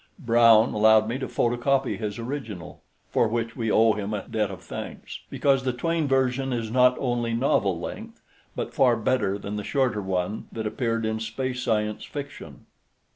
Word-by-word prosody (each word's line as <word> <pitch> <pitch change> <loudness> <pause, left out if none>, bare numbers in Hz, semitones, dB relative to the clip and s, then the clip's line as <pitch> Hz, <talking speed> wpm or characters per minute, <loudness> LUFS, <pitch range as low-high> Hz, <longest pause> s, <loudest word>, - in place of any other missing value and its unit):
Brown 115 - +5
allowed 110 0 +5
me 120 +4 -2
to 130 - -3
photocopy 125 +3 +1
his 105 -1 -4
original, 115 - -6 0.3
for 115 - +3
which 115 +1 -2
we 115 -3 -2
owe 110 +1 +4
him 105 0 -3
a 100 - -6
debt 110 -3 -1
of 95 - -9
thanks; - - -7
because 135 -2 +2
the 130 -1 0
Twayne 165 +4 -1
version 135 0 +1
is 115 -3 -2
not 125 +1 +4
only 120 -2 -1
novel 100 -7 +1
length, - - -7 0.4
but - - -4
far 125 -3 +4
better 110 -3 0
than 100 +1 -5
the 105 - -4
shorter 125 -3 0
one 95 +2 -2
that 110 -1 -5
appeared 115 +1 -1
in 110 0 -1
Space 125 +3 -3
Science 105 -3 -1
Fiction. 145 -1 -8
115 Hz, 175 wpm, -25 LUFS, 110-130 Hz, 0.4 s, Brown